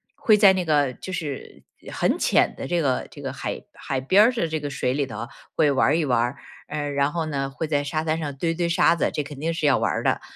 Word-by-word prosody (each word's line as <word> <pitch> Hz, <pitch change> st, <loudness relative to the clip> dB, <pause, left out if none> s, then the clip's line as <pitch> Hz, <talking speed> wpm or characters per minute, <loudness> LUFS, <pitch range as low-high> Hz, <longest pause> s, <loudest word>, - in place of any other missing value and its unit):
会 215 Hz, -2 st, +4 dB
在 200 Hz, -2 st, +7 dB
那 185 Hz, -1 st, -1 dB
个 145 Hz, -5 st, +2 dB
就 185 Hz, -, -9 dB
是 150 Hz, -7 st, -6 dB, 0.3 s
很 -, -, 0 dB
浅 -, -, +3 dB
的 135 Hz, -, -6 dB
这 175 Hz, +2 st, 0 dB
个， 135 Hz, -5 st, 0 dB
这 -, -, -12 dB
个 -, -, -4 dB
海 -, -, -4 dB
海 135 Hz, -1 st, -4 dB
边 190 Hz, +11 st, +5 dB
儿 245 Hz, -, +4 dB
的 230 Hz, -9 st, -1 dB
这 160 Hz, 0 st, -2 dB
个 145 Hz, -1 st, -4 dB
水 130 Hz, -2 st, -1 dB
里 140 Hz, -1 st, -1 dB
头 115 Hz, 0 st, -6 dB, 0.3 s
会 150 Hz, -2 st, +3 dB
玩 135 Hz, -, +3 dB
儿 150 Hz, -, +3 dB
一 160 Hz, -, 0 dB
玩 125 Hz, -3 st, +2 dB
儿。 125 Hz, +3 st, -2 dB, 0.3 s
呃， 145 Hz, -1 st, -3 dB
然 140 Hz, +1 st, +1 dB
后 165 Hz, -2 st, -2 dB
呢， 135 Hz, -2 st, -2 dB
会 155 Hz, +3 st, -4 dB
在 145 Hz, -2 st, 0 dB
沙 155 Hz, +2 st, -2 dB
滩 160 Hz, 0 st, 0 dB
上 145 Hz, -3 st, -4 dB
堆 165 Hz, +4 st, -1 dB
堆 170 Hz, +1 st, -1 dB
沙 170 Hz, 0 st, +4 dB
子 170 Hz, -, 0 dB
这 -, -, -1 dB
肯 145 Hz, -1 st, -10 dB
定 160 Hz, +3 st, -1 dB
要 140 Hz, -3 st, +4 dB
玩 -, -, +1 dB
儿 -, -, -2 dB
的。 -, -, +1 dB
150 Hz, 285 characters per minute, -24 LUFS, 140-165 Hz, 0.3 s, 在